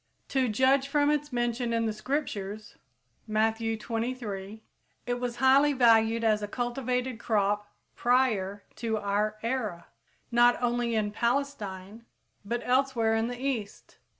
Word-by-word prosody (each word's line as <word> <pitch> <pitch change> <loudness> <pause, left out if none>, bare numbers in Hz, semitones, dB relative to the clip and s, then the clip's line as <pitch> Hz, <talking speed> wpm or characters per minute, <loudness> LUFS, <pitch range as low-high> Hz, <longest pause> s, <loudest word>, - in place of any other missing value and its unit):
To 260 -3 +1
judge 265 +5 +3
from 290 +1 +2
its 295 0 -1
mention 240 0 -1
in 230 0 +1
the 220 - -1
Scriptures 215 -4 -4 0.5
(Matthew 220 +1 +1
xxiii, 230 +3 -3
23), 210 -2 -7 0.4
it 245 0 -2
was 245 -1 -3
highly 270 +3 +5
valued 230 -2 +4
as 215 -2 +2
a 205 - -3
cultivated 250 +1 -2
crop 205 -2 0 0.3
prior 220 -6 +1
to 225 -2 -1
our 210 +1 -1
era, 225 -8 -3 0.4
not 240 0 +5
only 240 -1 0
in 210 -1 0
Palestine, 225 -4 -2 0.4
but 235 +4 -3
elsewhere 250 -3 +2
in 225 +1 +1
the 245 0 -6
East. 250 -7 -4
230 Hz, 135 wpm, -28 LUFS, 215-255 Hz, 0.5 s, highly